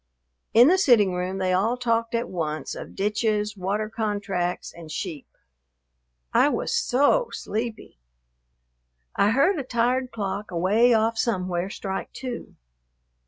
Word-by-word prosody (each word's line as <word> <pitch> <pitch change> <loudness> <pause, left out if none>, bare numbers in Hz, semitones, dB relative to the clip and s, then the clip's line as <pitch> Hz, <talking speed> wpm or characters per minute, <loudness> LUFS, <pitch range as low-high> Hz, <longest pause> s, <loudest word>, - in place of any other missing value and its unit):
In 240 +3 +8
the 370 +4 +4
sitting 220 - +4
room 180 +1 -2
they 185 -1 0
all 220 +7 +1
talked 230 -1 0
at 230 - -1
once 155 -4 -3
of - - -9
ditches, 210 +1 0
water 200 +3 -2
contracts, 205 -5 -2
and 165 -2 -11
sheep. 155 -3 -5 1.1
I 285 - +5
was 465 +10 -2
so 470 - +2
sleepy. 220 - -5 1.2
I 200 - +3
heard 290 - +3
a - - -2
tired 250 +1 0
clock 205 -1 -4
away 195 +8 +3
off 225 0 +2
somewhere 185 -4 -1
strike 195 -1 -5
two. 250 -2 -7
215 Hz, 130 wpm, -25 LUFS, 190-240 Hz, 1.2 s, In